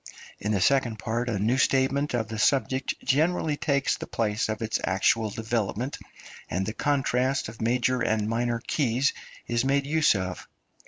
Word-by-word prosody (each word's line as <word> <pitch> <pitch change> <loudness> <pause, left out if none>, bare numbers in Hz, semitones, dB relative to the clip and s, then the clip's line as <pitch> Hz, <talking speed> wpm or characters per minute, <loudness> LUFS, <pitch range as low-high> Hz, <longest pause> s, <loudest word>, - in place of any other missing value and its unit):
In 105 - -2
the 100 - +1
second 125 -1 +2
part 120 +3 -2
a 110 - -1
new 115 +6 +1
statement 135 +1 +2
of 115 -2 -1
the 110 -1 -5
subject 135 +2 +1
generally 155 +2 +1
takes 140 0 +1
the - - -7
place 110 -1 -1
of 110 +1 -2
its 110 - -1
actual 105 +4 +2
development, 115 +4 -2 0.5
and 95 +4 -1
the 110 - -3
contrast 130 -1 0
of 110 - -11
major 125 +2 +1
and 110 -2 +1
minor 120 +1 0
keys 130 -1 +1 0.3
is 120 0 0
made 140 +1 +1
use 155 -4 +3
of. 95 -2 -4
120 Hz, 165 wpm, -26 LUFS, 110-135 Hz, 0.5 s, use